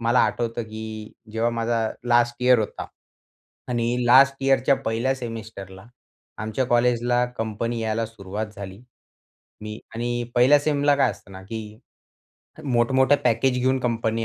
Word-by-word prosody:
मला 120 Hz, +2 st, +3 dB
आठवतं 120 Hz, 0 st, -1 dB
की 110 Hz, -1 st, -8 dB, 0.2 s
जेव्हा 115 Hz, +1 st, 0 dB
माझा 115 Hz, -1 st, -1 dB, 0.2 s
लास्ट 120 Hz, 0 st, +3 dB
इयर 125 Hz, -1 st, +5 dB
होता 110 Hz, -, -4 dB, 0.8 s
आणि 120 Hz, -2 st, -1 dB, 0.2 s
लास्ट 135 Hz, +3 st, +6 dB
यिअरच्या 135 Hz, 0 st, +3 dB
पहिल्या 115 Hz, +4 st, 0 dB
सेमेस्टरला 110 Hz, -6 st, -8 dB, 0.6 s
आमच्या 110 Hz, +4 st, -1 dB
कॉलेजला 120 Hz, 0 st, +2 dB
कंपनी 115 Hz, +1 st, -2 dB
यायला 110 Hz, 0 st, -1 dB
सुरुवात 105 Hz, -1 st, -6 dB
झाली. 95 Hz, -1 st, -8 dB, 0.8 s
मी 105 Hz, +1 st, -6 dB, 0.2 s
आणि 120 Hz, +1 st, -2 dB
पहिल्या 130 Hz, +4 st, +6 dB
सेमला 145 Hz, -1 st, +2 dB
काय 140 Hz, -, +3 dB
असतं 100 Hz, -, -13 dB
ना 95 Hz, 0 st, -10 dB
की 110 Hz, +4 st, -6 dB, 1.0 s
मोठं-मोठं 130 Hz, +2 st, +3 dB
पॅकेज 125 Hz, +3 st, +2 dB
घेऊन 130 Hz, +1 st, +1 dB
कंपनी 115 Hz, -2 st, -1 dB
115 Hz, 130 wpm, -23 LUFS, 110-125 Hz, 1.0 s, लास्ट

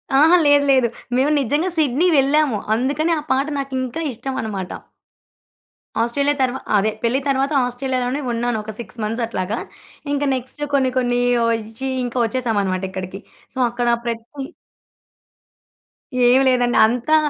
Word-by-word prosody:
అహా! 315 Hz, +6 st, +6 dB
లేదు. 290 Hz, 0 st, +5 dB
లేదు. 260 Hz, -3 st, +4 dB, 0.3 s
మేము 275 Hz, +4 st, +2 dB
నిజంగా 290 Hz, +7 st, 0 dB
సిడ్నీ 305 Hz, +2 st, +2 dB
వెళ్ళాము. 275 Hz, -2 st, +3 dB, 0.2 s
అందుకని 280 Hz, +7 st, 0 dB
ఆ -, -, -5 dB
పాట 270 Hz, +2 st, +2 dB
నాకు 275 Hz, -1 st, -5 dB
ఇంకా 255 Hz, +6 st, -4 dB
ఇష్టమన్నమాట. 220 Hz, -6 st, -4 dB, 1.3 s
ఆస్ట్రేలియా 280 Hz, +5 st, +1 dB
తరువా 260 Hz, 0 st, 0 dB, 0.2 s
అదే 210 Hz, +2 st, +2 dB
పెళ్లి 235 Hz, +3 st, +1 dB
తరువాత 275 Hz, +1 st, +1 dB
ఆస్ట్రేలియాలోనే 255 Hz, +2 st, -2 dB
ఉన్నాను. 235 Hz, 0 st, -1 dB
ఒక 220 Hz, -, -6 dB
6 235 Hz, 0 st, -7 dB
మంత్స్ 225 Hz, +3 st, -2 dB
అట్లాగా. 205 Hz, -1 st, -3 dB, 0.6 s
ఇంకా 290 Hz, 0 st, 0 dB
నెక్స్ట్ 260 Hz, +3 st, -5 dB
కొన్ని 265 Hz, -2 st, +2 dB
కొన్ని 245 Hz, -1 st, +1 dB, 0.3 s
ఒచ్చి 225 Hz, +3 st, -4 dB, 0.2 s
ఇంకా 245 Hz, +1 st, -5 dB
వచ్చేసామన్నమాట 205 Hz, -6 st, -1 dB
ఇక్కడికి. 185 Hz, +1 st, -6 dB, 0.3 s
సో, -, -, -4 dB
అక్కడ 240 Hz, 0 st, -2 dB, 0.2 s
ప్రతి 230 Hz, -1 st, -3 dB, 2.0 s
ఏమి 260 Hz, +2 st, +5 dB
లేదండి. 245 Hz, -1 st, +2 dB
అంతా 245 Hz, +6 st, +1 dB
250 Hz, 130 wpm, -20 LUFS, 230-275 Hz, 2.0 s, అహా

